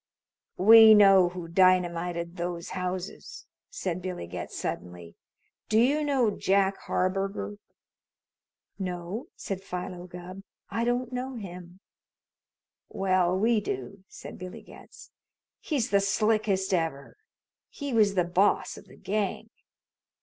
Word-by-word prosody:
"We 220 +2 +9
know 195 -3 +6
who 175 -1 -7
dynamited 175 -1 +1
those 175 -1 -4
houses!" 185 - -5 0.2
said 185 - -4
Billy 180 - -5
Getz 85 0 -7
suddenly. 90 -1 -6 0.6
"Do 215 - +2
you 285 +6 +3
know 265 -7 +2
Jack 195 0 +1
Harburger?" 195 +2 -2 1.2
"No," 180 +4 -5
said 195 -1 -5
Philo 180 -1 -6
Gubb. 180 +2 -9 0.3
"I 230 +1 -1
don't 245 +1 -1
know 255 +1 -4
him." 180 -3 -9 1.1
"Well, 185 -2 +1
we 225 +3 +2
do," 205 - -6
said - - -11
Billy 185 0 -8
Getz. - - -15 0.5
"He's 265 -6 -2
the 200 - +5
slickest 200 -1 +1
ever. 165 -6 -2 0.5
He 285 -3 -6
was 210 -3 +3
the 180 - +3
boss 180 +4 +1
of - - -13
the - - -16
gang. 205 -1 -3
190 Hz, 120 wpm, -27 LUFS, 180-215 Hz, 1.2 s, We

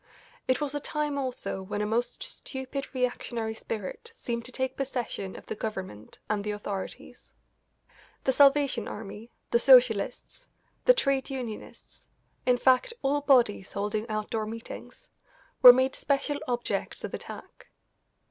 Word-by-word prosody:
It 255 - +2
was 295 -2 -2
a 290 - -1
time 295 0 -2
also 245 -7 -3
when 205 +2 -4
a 210 - 0
most 230 +3 -1
stupid 270 +1 -6
reactionary 240 -3 -1
spirit 220 - -6
seemed 235 - -4
to 255 - -6
take 260 +1 -2
possession 245 -8 -3
of - - -11
the - - -4
Government 190 - -6
and 210 -1 -1
the 210 - -3
authorities. 205 -2 -6 0.9
The 265 - +3
Salvation 275 -4 +4
Army, 210 +2 -8 0.2
the 235 - +4
Socialists, 250 - +4 0.4
the - - +7
trade 275 - +1
unionists 250 -5 -8 0.4
in 250 -1 +5
fact, 260 - +3
all 285 +2 +2
bodies 245 -9 +3
holding 210 +3 -2
outdoor 215 0 -2
meetings 230 - -9 0.5
were 250 - +13
made 260 +1 +1
special 285 +1 0
objects 245 -1 -2
of - - -5
attack. - - -9
245 Hz, 140 wpm, -28 LUFS, 215-270 Hz, 0.9 s, were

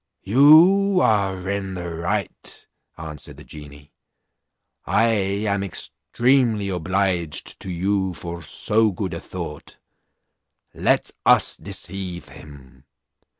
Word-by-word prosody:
"You 170 - +6
are 95 -3 +1
in 100 -1 -3
the 90 -1 -5
right," 85 +4 -4 0.3
answered 75 -3 -9
the - - -12
genie; 75 -1 -13 0.9
"I 115 - +2 0.4
am 100 -1 0
extremely 115 +3 0
obliged 90 -3 -1
to 95 - -7
you 95 +1 -1
for 85 0 -7
so 110 +7 +1
good 95 -1 -4
a 85 - -4
thought; 85 -5 -8 1.0
let - - +1
us - - +4
deceive 90 -1 -5
him. 70 -3 -15
95 Hz, 105 wpm, -22 LUFS, 85-105 Hz, 1.0 s, You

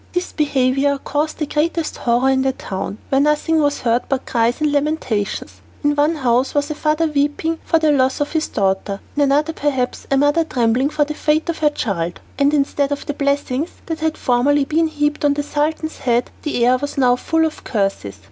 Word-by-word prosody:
This 360 0 -2
behaviour 280 -1 +1
caused 295 +3 -2
the 305 - -1
greatest 315 +2 -1
horror 245 +2 +2
in 265 0 +2
the 265 0 +1
town, 195 -2 -5
where 270 0 +3
nothing 300 +2 +2
was 290 -1 0
heard 235 0 +2
but 270 -1 -1
cries 235 +1 +1
and 305 -1 +1
lamentations. 285 -8 -2 0.2
In 290 0 +2
one 295 +3 +2
house 255 -2 +1
was 290 +1 0
a - - 0
father 305 +2 +1
weeping 300 +2 0
for 330 - +2
the 315 -1 +3
loss 265 -2 +2
of 290 - -1
his 315 -1 0
daughter, 195 0 -1 0.2
in 295 - +1
another 290 +3 +2
perhaps 270 -5 -2
a 275 - +2
mother 290 +4 +3
trembling 250 -2 +1
for 300 -1 +1
the 300 - -4
fate 305 +2 0
of 335 - -2
her 300 - +4
child; 175 - -3 0.2
and 280 0 +4
instead 285 -1 +1
of 285 - -3
the 290 - -3
blessings 280 +1 -1 0.2
that 325 -1 -4
had 315 0 -1
formerly 275 +3 +2
been 320 +3 +1
heaped 295 -1 -1
on 290 -1 +3
the 290 - -1
Sultan's 310 +2 -2
head, 240 -1 0
the 245 -6 0
air 250 +1 +4
was 285 +2 -5
now 250 -2 +4
full 320 +5 +1
of 315 - -5
curses. 195 - -2
285 Hz, 205 wpm, -19 LUFS, 255-305 Hz, 0.2 s, her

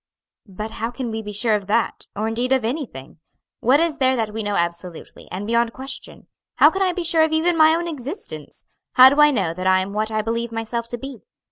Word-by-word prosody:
"But 210 +4 -6
how 225 +1 -3
can 245 -1 -5
we 220 0 -3
be 210 -1 -7
sure 215 +2 +1
of 205 -2 -1
that, 225 +2 -1
or, 215 +2 -2
indeed, 240 +3 -2
of 260 -4 +1
anything? 225 - -5 0.4
What 260 +5 +4
is 325 -2 0
there 260 -1 +3
that 220 -3 -2
we 225 - -3
know 205 -1 -2
absolutely, 170 -1 -4
and 190 +3 -5
beyond 235 +1 +1
question? 265 +1 -8 0.3
how - - +6
can 385 - -3
I 375 -1 +3
be 355 0 -4
sure 330 -1 +3
of 315 - +1
even 325 +2 +2
my 315 0 +5
own 340 +1 -2
existence? 300 - -7 0.3
how 255 0 +9
do 290 +1 +3
I 295 - +7
know 195 - 0
that 185 +2 -3
I 185 0 +4
am 190 +2 -4
what 215 +1 -1
I 215 -1 -1
believe 230 +1 -2
myself 230 +1 -3
to 240 - -5
be? 270 0 -8
230 Hz, 235 wpm, -21 LUFS, 210-280 Hz, 0.4 s, how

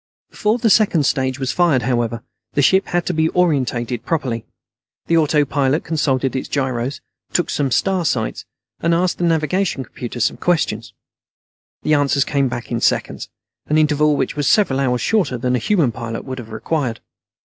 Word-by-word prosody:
Before 215 +2 0
the 225 -3 +2
second 190 -9 +4
stage 130 -1 0
was 130 -1 -1
fired, 165 -8 +2
however, 120 -2 -1 0.3
the 145 - +2
ship 190 +7 +4
had 175 -1 -1
to 180 - -1
be 160 0 +2
oriented 130 -9 0
properly. 125 -8 -2 0.6
The 165 - +1
autopilot 145 -2 +2
consulted 135 -5 0
its 130 - -3
gyros, 130 -1 -2 0.3
took 175 - +1
some 140 -2 0
star 190 +7 +1
sights, 115 -8 -1 0.4
and 170 0 +2
asked 180 +1 0
the - - -1
navigation 165 -1 0
computer 120 0 -7
some - - +1
questions. 150 -11 -1 0.9
The 155 - +2
answers 140 -2 +2
came 140 -2 +1
back 120 0 -6
in 115 -1 -1
seconds, - - 0 0.4
an 150 - +2
interval 150 -1 +3
which - - -1
was 145 -2 -1
several 165 -11 +3
hours 125 -3 0
shorter 195 - +1
than 125 +1 0
a - - +1
human 160 - +2
pilot 115 -1 -6
would 130 -1 -5
have 115 -2 -9
required. 125 +1 -2
140 Hz, 170 wpm, -19 LUFS, 125-165 Hz, 0.9 s, second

